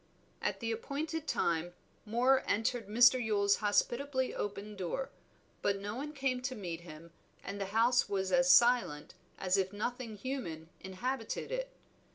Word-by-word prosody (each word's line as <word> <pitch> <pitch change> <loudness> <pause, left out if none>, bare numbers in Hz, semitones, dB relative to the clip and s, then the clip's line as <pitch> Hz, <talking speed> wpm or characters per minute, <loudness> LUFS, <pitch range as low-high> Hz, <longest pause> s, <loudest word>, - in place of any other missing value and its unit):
At - - -2
the 230 -1 -1
appointed 300 +7 -3
time 170 - 0 0.3
Moor 250 +4 +3
entered 225 +1 0
Mr. 245 +4 +6
Yule's 200 -2 +2
hospitably 260 +5 0
open 205 +1 -4
door; 195 +8 -3 0.5
but 200 -1 +1
no 205 +1 -4
one 290 +4 -4
came 270 -3 -1
to 255 0 -3
meet 175 -6 -5
him, 165 0 -12 0.3
and 200 +1 -5
the - - 0
house 230 +3 +3
was 190 -1 -1
as 265 0 +5
silent 235 -12 +4 0.2
as 185 0 +1
if 190 -1 0
nothing 230 +2 -4
human 190 - -5
inhabited 225 +6 -4
it. - - -2
225 Hz, 150 wpm, -33 LUFS, 195-255 Hz, 0.5 s, Mr